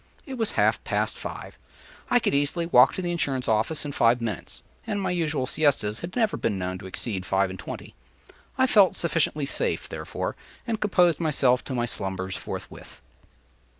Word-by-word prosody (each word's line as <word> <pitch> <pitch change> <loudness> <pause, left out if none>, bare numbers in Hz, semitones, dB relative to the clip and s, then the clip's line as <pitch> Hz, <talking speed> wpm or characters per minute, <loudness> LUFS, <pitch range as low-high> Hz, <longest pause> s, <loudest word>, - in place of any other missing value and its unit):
It 270 - -7
was 225 -4 -1
half - - +2
past - - -1
five; - - -8 0.5
I 245 - +5
could 235 - +1
easily 145 +4 +1
walk 125 -7 +6
to 185 - -3
the 175 - -1
insurance 135 -7 -1
office 115 +8 +1
in 145 - -3
five 120 -2 +3
minutes; 110 -6 -5 0.2
and 210 -2 -1
my 190 - -1
usual 155 -6 0
siestas 130 -7 +1
had 170 +2 -7
never 225 -3 +1
been 105 - -1
known 90 0 -3
to 95 - -8
exceed 95 0 -2
five 95 0 +1
and 95 - -8
twenty. - - -7 0.6
I 260 - +4
felt 205 -7 +5
sufficiently 155 -3 0
safe, - - -1
therefore, - - -4 0.3
and 225 -2 -2
composed 180 -5 +3
myself 135 -6 +2
to 130 - -3
my 120 -1 +1
slumbers 95 -4 -3
forthwith. - - -8
140 Hz, 180 wpm, -26 LUFS, 110-175 Hz, 0.6 s, walk